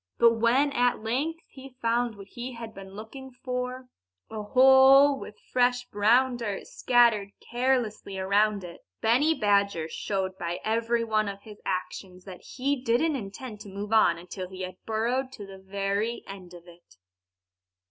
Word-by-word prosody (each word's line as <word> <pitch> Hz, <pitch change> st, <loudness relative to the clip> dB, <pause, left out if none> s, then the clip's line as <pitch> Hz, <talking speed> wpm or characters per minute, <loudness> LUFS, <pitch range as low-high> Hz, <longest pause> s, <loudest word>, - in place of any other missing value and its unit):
But 230 Hz, -1 st, +4 dB
when 255 Hz, +5 st, +3 dB
at 245 Hz, -4 st, +1 dB
length 295 Hz, +9 st, -2 dB
he 265 Hz, -1 st, -13 dB
found 235 Hz, -1 st, 0 dB
what 200 Hz, -1 st, -11 dB
he 245 Hz, +2 st, -7 dB
had 230 Hz, -2 st, -8 dB
been 195 Hz, 0 st, -11 dB
looking 265 Hz, +6 st, -9 dB
for 250 Hz, 0 st, -5 dB, 0.4 s
a 220 Hz, -1 st, -4 dB
hole 265 Hz, +4 st, +6 dB
with 210 Hz, -, -10 dB, 0.2 s
fresh 245 Hz, 0 st, +2 dB
brown 240 Hz, +5 st, +3 dB
dirt 210 Hz, -5 st, -4 dB
scattered 235 Hz, -5 st, +3 dB
carelessly 240 Hz, -5 st, -1 dB
around 200 Hz, +1 st, +1 dB
it 170 Hz, -1 st, -10 dB, 0.2 s
Benny 280 Hz, +8 st, +3 dB
Badger 200 Hz, -, +1 dB
showed 190 Hz, +2 st, -3 dB
by 170 Hz, 0 st, -3 dB
every 230 Hz, +1 st, 0 dB
one 215 Hz, -2 st, 0 dB
of 200 Hz, 0 st, -7 dB
his 210 Hz, -1 st, -13 dB
actions 185 Hz, 0 st, -5 dB
that 185 Hz, -2 st, -10 dB
he 275 Hz, +2 st, -2 dB
didn't 265 Hz, +6 st, +1 dB
intend 215 Hz, 0 st, -7 dB
to 205 Hz, -1 st, -10 dB
move 205 Hz, +3 st, -5 dB
on 195 Hz, -6 st, +5 dB
until 180 Hz, +1 st, -7 dB
he 185 Hz, 0 st, -9 dB
had 185 Hz, 0 st, -7 dB
burrowed 240 Hz, +4 st, -1 dB
to 205 Hz, -, -9 dB
the 195 Hz, -1 st, -11 dB
very 200 Hz, +4 st, -2 dB
end 185 Hz, -3 st, -10 dB
of 175 Hz, -, -13 dB
it. 175 Hz, -, -18 dB
220 Hz, 160 wpm, -27 LUFS, 195-250 Hz, 0.4 s, hole